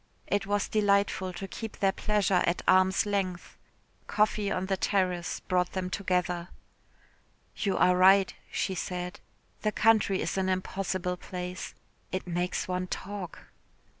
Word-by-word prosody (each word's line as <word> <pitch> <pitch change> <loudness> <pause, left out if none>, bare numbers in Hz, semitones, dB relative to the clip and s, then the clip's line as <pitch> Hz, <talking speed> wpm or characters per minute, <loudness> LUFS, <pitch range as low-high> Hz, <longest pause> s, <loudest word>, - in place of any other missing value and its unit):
It 205 -1 -1
was 205 0 +1
delightful 200 -3 +2
to 195 +2 -6
keep 220 +3 -7
their 195 -1 +3
pleasure 200 -3 +1
at 170 - 0
arm's 185 +1 +4
length. 195 -3 -2 0.5
Coffee 210 -1 +1
on 185 -1 -1
the 195 0 0
terrace 185 -3 0
brought 180 -1 0
them 185 -1 -3
together. 180 -3 -1 1.1
"You 200 -3 0
are 180 - +5
right," 190 +1 +6 0.2
she 190 - -1
said, 180 0 -4 0.4
"the 215 - +1
country 210 -3 +3
is - - -1
an 190 0 0
impossible 185 -1 -2
place. 180 0 -6 0.4
It 185 - -3
makes 175 0 -2
one 185 0 -2
talk." 195 -1 -6
185 Hz, 135 wpm, -29 LUFS, 180-200 Hz, 1.1 s, right